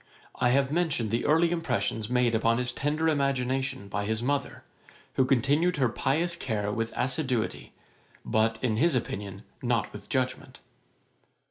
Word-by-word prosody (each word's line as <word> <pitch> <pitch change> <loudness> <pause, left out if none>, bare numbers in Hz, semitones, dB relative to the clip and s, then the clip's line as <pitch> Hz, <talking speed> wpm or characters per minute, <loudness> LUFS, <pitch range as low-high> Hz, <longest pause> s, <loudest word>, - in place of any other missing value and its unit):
I 125 - +1
have 135 +2 +2
mentioned 155 -10 0
the 115 - 0
early 165 +3 +4
impressions 110 -10 -1
made 125 -1 +2
upon 115 +1 +2
his 125 0 -1
tender 150 +4 0
imagination 135 -6 0
by 100 +1 -3
his 110 +2 -1
mother, 140 +2 -2 0.5
who 130 - +3
continued 145 +7 +2
her 130 -4 +2
pious 160 +9 0
care 105 -9 -2
with 115 +2 -2
assiduity, 130 -3 -1 0.5
but, 110 +1 +1
in 110 -4 +1
his 160 +3 +3
opinion, 100 -4 -4 0.2
not 120 -4 0
with - - -10
judgement. - - -2
125 Hz, 145 wpm, -28 LUFS, 115-145 Hz, 0.5 s, early